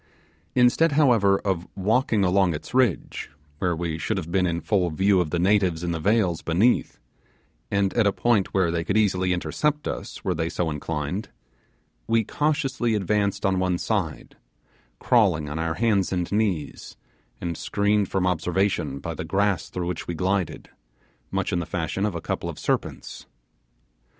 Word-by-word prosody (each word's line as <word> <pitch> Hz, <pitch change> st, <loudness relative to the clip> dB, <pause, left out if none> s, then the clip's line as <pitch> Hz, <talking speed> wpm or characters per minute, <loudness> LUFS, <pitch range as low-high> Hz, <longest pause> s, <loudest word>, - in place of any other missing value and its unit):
Instead 130 Hz, +6 st, +4 dB
however 115 Hz, -10 st, +4 dB
of 95 Hz, -3 st, -2 dB
walking 110 Hz, +2 st, +1 dB
along 90 Hz, -2 st, +3 dB
its 75 Hz, -, -9 dB
ridge, 125 Hz, -7 st, 0 dB, 0.3 s
where 90 Hz, -2 st, 0 dB
we 80 Hz, -1 st, -3 dB
should 105 Hz, +6 st, -1 dB
have 85 Hz, -3 st, -5 dB
been 90 Hz, 0 st, +2 dB
in 85 Hz, -1 st, -1 dB
full 90 Hz, +2 st, +1 dB
view 95 Hz, +4 st, +3 dB
of 85 Hz, -, -2 dB
the 85 Hz, -, -1 dB
natives 90 Hz, -2 st, +2 dB
in 85 Hz, -, -1 dB
the 80 Hz, -, -2 dB
vales 95 Hz, -2 st, +1 dB
beneath, 95 Hz, +9 st, +1 dB, 0.7 s
and 100 Hz, -1 st, +1 dB
at 115 Hz, -3 st, +3 dB
a -, -, +4 dB
point 110 Hz, -1 st, +1 dB
where 95 Hz, -3 st, +2 dB
they 85 Hz, -1 st, -1 dB
could 95 Hz, +5 st, 0 dB
easily 95 Hz, -4 st, +2 dB
intercept 150 Hz, +11 st, -1 dB
us -, -, -6 dB
were 95 Hz, -, +1 dB
they 80 Hz, 0 st, -2 dB
so 85 Hz, -2 st, -1 dB
inclined, 75 Hz, +6 st, -3 dB, 0.8 s
we 115 Hz, 0 st, +3 dB
cautiously 135 Hz, -4 st, 0 dB
advanced 100 Hz, 0 st, 0 dB
on 95 Hz, -1 st, +2 dB
one 90 Hz, -1 st, +1 dB
side, 95 Hz, -6 st, -3 dB, 0.6 s
crawling 95 Hz, -11 st, +3 dB
on 75 Hz, +2 st, -4 dB
our 80 Hz, 0 st, -1 dB
hands 105 Hz, -5 st, +1 dB
and 90 Hz, -2 st, -2 dB
knees, 100 Hz, -8 st, -2 dB, 0.4 s
and 85 Hz, -1 st, -3 dB
screened 100 Hz, +2 st, 0 dB
from 95 Hz, -1 st, 0 dB
observation 90 Hz, -4 st, 0 dB
by 80 Hz, +4 st, -5 dB
the 80 Hz, -, -5 dB
grass 100 Hz, +2 st, 0 dB
through 90 Hz, -1 st, -4 dB
which 90 Hz, -1 st, -4 dB
we 85 Hz, -, -3 dB
glided, 95 Hz, +1 st, -1 dB, 0.6 s
much -, -, -2 dB
in 90 Hz, -, +1 dB
the 85 Hz, -, -3 dB
fashion 90 Hz, +4 st, -1 dB
of 100 Hz, -, -4 dB
a 85 Hz, -, -4 dB
couple -, -, -3 dB
of -, -, -7 dB
serpents. -, -, -3 dB
95 Hz, 170 wpm, -24 LUFS, 85-105 Hz, 0.8 s, Instead